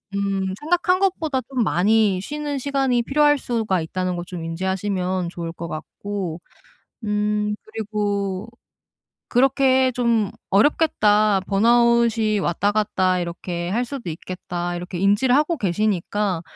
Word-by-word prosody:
음 195 -1 -1
생각한 355 +4 +1
것보다 325 -8 0
좀 255 -3 0
많이 205 0 +2
쉬는 295 +4 -4
시간이 270 -3 0
필요할 295 +2 +3
수가 220 -8 -1
있다는 185 +2 -2
걸 175 - -5
좀 175 -2 -7
인지하시면 185 +1 -2
좋을 170 -1 -6
것 170 0 -6
같고 175 +2 -5 0.6
음 210 0 0
그리고 205 -2 -3 0.8
그렇게 260 0 +3
좀 235 -5 +1 0.2
'어렵겠다. 210 -4 +3
번아웃이 230 0 +3
왔다 195 +3 0
갔다 190 -3 +1
이렇게 175 0 -4
할 230 +6 0
수도 245 -8 -6
있겠다.' 175 +1 -5
이렇게 180 +1 -6
인지를 205 +6 +3
하고 305 +3 +2
계시니까 200 - 0
210 Hz, 275 characters per minute, -22 LUFS, 185-245 Hz, 0.8 s, 필요할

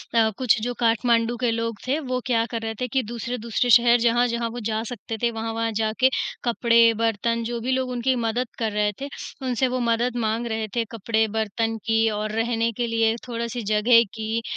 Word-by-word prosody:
अ, 220 -1 +4
कुछ 245 -3 +3
जो 245 +2 -2
काठमांडू 230 0 +2
के 245 -1 +1
लोग 230 -1 -2
थे 285 +4 +1
वो 255 -3 -2
क्या 230 -3 +2
कर 230 - -3
रहे 225 0 -3
थे 250 - 0
कि 260 +1 0
दूसरे-दूसरे 235 +1 -3
शहर 235 +1 +6
जहाँ-जहाँ 235 0 +1
वो 240 +1 -6
जा 220 0 -1
सकते 225 -1 -6
थे 235 - +3
वहाँ-वहाँ 225 0 -2
जाके 220 +4 +2 0.3
कपड़े, 235 -1 +4
बर्तन 230 +1 0
जो 235 +1 -3
भी 255 +3 -1
लोग 260 0 0
उनकी 250 +1 0
मदद 235 +1 -1
कर 220 -2 0
रहे 210 0 +1
थे, 280 - -3 0.4
उनसे 255 +1 +1
वो 255 0 -2
मदद 235 +1 0
माँग 225 +2 -1
रहे 220 -1 -2
थे 230 -1 +1
कपड़े, 220 0 0
बर्तन 225 +1 -2
की 225 0 +3
और 210 0 -3
रहने 230 +1 0
के 240 -1 0
लिए 225 0 +2
थोड़े-से 235 0 -4
जगह 230 +2 +5
की, 220 +1 -2
230 Hz, 200 wpm, -24 LUFS, 225-240 Hz, 0.4 s, शहर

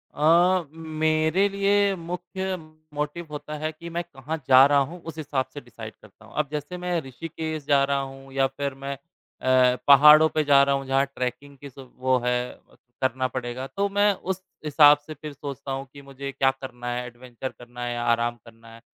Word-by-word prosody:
अ, 170 +3 +4
मेरे 160 +3 +1
लिए 200 0 +2
मुख्य 180 +2 -4 0.4
मोटिव 150 +3 -4
होता 150 +1 -6
है 155 +1 -2
कि 170 +2 -10
मैं 170 +1 -3
कहाँ 160 -1 -6
जा 130 0 +8
रहा 145 0 +4
हूँ, 165 +5 -3
उस 165 -1 -9
हिसाब 140 -4 -2
से 145 - -7
डिसाइड 115 -3 -10
करता 105 -3 -18
हूँ, - - -17
अब 150 - +1
जैसे 150 +4 -5
मैं 180 -1 -1
ऋषिकेश 155 +3 -6
जा 140 -1 +4
रहा 140 0 +1
हूँ 135 0 -10
या 135 0 +2
फिर 140 +1 -4
मैं 135 +1 -6 0.5
अ, 130 -1 +4
पहाड़ों 150 +3 +8
पे 155 - +3
जा 140 -1 +6
रहा 140 0 +2
हूँ 135 0 -4
जहाँ 135 +1 +2
ट्रेकिंग 130 +3 -4
की 140 +1 -10
सु 135 +1 -13 0.2
वो 130 0 +2
है 125 0 +2 0.6
करना 130 0 0
पड़ेगा, 125 +1 -5
तो 200 +6 -1
मैं 205 +1 +3
उस 190 0 -5 0.2
हिसाब 145 0 +7
से 155 - -6
फिर 150 -1 -9
सोचता 140 -1 -7
हूँ 135 +1 -3
कि 140 - -11
मुझे 140 0 -7
क्या 135 0 +2
करना 120 -2 -8
हैं 125 0 -3
एडवेंचर 125 +1 -8
करना 120 0 -11
है 120 0 -2
या 120 - -3
आराम 120 0 +1
करना 115 0 -16
है। 115 - -14
140 Hz, 200 wpm, -25 LUFS, 130-160 Hz, 0.6 s, जा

